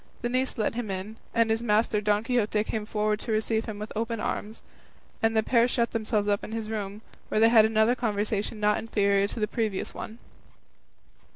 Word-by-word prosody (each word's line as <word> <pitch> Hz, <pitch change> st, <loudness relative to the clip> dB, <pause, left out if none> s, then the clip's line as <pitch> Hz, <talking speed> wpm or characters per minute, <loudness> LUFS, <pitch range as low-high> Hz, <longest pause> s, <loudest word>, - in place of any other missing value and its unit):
The 240 Hz, -, 0 dB
niece 255 Hz, +2 st, 0 dB
let 215 Hz, -, 0 dB
him 235 Hz, -2 st, -4 dB
in, 195 Hz, +3 st, -5 dB
and 230 Hz, -1 st, +2 dB
his 225 Hz, +1 st, +1 dB
master 215 Hz, -1 st, +2 dB
Don 210 Hz, 0 st, +2 dB
Quixote 220 Hz, -3 st, +1 dB
came 215 Hz, -1 st, -4 dB
forward 210 Hz, -1 st, 0 dB
to 225 Hz, -, -5 dB
receive 220 Hz, +1 st, 0 dB
him 215 Hz, -2 st, -6 dB
with 210 Hz, +1 st, -6 dB
open 230 Hz, +1 st, -2 dB
arms, 215 Hz, +1 st, -4 dB, 0.6 s
and 225 Hz, 0 st, +2 dB
the 220 Hz, -, +4 dB
pair 235 Hz, +1 st, +3 dB
shut 235 Hz, -2 st, 0 dB
themselves 215 Hz, -2 st, 0 dB
up 205 Hz, -1 st, +1 dB
in 220 Hz, -, -6 dB
his 225 Hz, -1 st, -4 dB
room, 210 Hz, 0 st, -4 dB, 0.3 s
where -, -, +1 dB
they 225 Hz, +1 st, +6 dB
had 225 Hz, -2 st, +7 dB
another 220 Hz, +2 st, +3 dB
conversation 215 Hz, -2 st, -2 dB
not 210 Hz, 0 st, +2 dB
inferior 200 Hz, -3 st, +2 dB
to 215 Hz, -, -6 dB
the 210 Hz, -, +1 dB
previous 215 Hz, -5 st, -2 dB
one. 220 Hz, -, -7 dB
220 Hz, 200 wpm, -27 LUFS, 210-225 Hz, 0.6 s, had